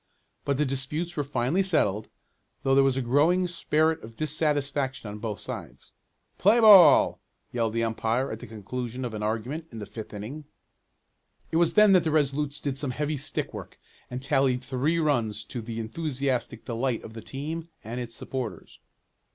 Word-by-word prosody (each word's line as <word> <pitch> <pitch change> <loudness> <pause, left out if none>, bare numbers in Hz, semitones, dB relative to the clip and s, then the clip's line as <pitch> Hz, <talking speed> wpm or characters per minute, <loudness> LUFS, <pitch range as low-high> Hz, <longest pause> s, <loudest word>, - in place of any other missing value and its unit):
But 140 -1 +1
the 150 - +2
disputes 145 +6 -3
were 145 - 0
finally 140 +5 0
settled, 110 - +1 0.5
though 135 - +2
there 135 0 +6
was 135 -1 +2
a 135 - 0
growing 160 +9 +3
spirit 160 -2 +1
of 115 +1 -11
dissatisfaction 145 -4 -1
on 105 +1 -7
both 105 -2 -4
sides. - - -8 0.5
"Play 210 +5 +5
ball!" 195 - +8 0.3
yelled 115 -2 0
the 115 0 +1
umpire, 115 +3 0
at 110 - -5
the - - -9
conclusion 120 +4 -5
of 120 - -5
an 105 - -4
argument 115 +9 -3
in 115 - -9
the 105 - -5
fifth 110 +1 -8
inning. 120 +9 -7 1.1
It 160 - +1
was 170 -1 +3
then 210 -1 +6
that 185 -2 +6
the 160 - 0
Resolutes 145 -1 0
did 140 -2 -3
some 145 - -1
heavy 150 +4 -2
stick 145 +1 -3
work, - - -8 0.3
and 125 +1 -5
tallied 135 -2 +2
three 135 +5 0
runs 120 -10 0
to 120 +3 -6
the 115 0 -5
enthusiastic 135 +1 -2
delight 120 0 -1
of 110 - -10
the 115 - -8
team 155 +8 -5
and 115 +3 -5
its 115 -1 -7
supporters. 120 -10 -6
135 Hz, 175 wpm, -27 LUFS, 115-155 Hz, 1.1 s, ball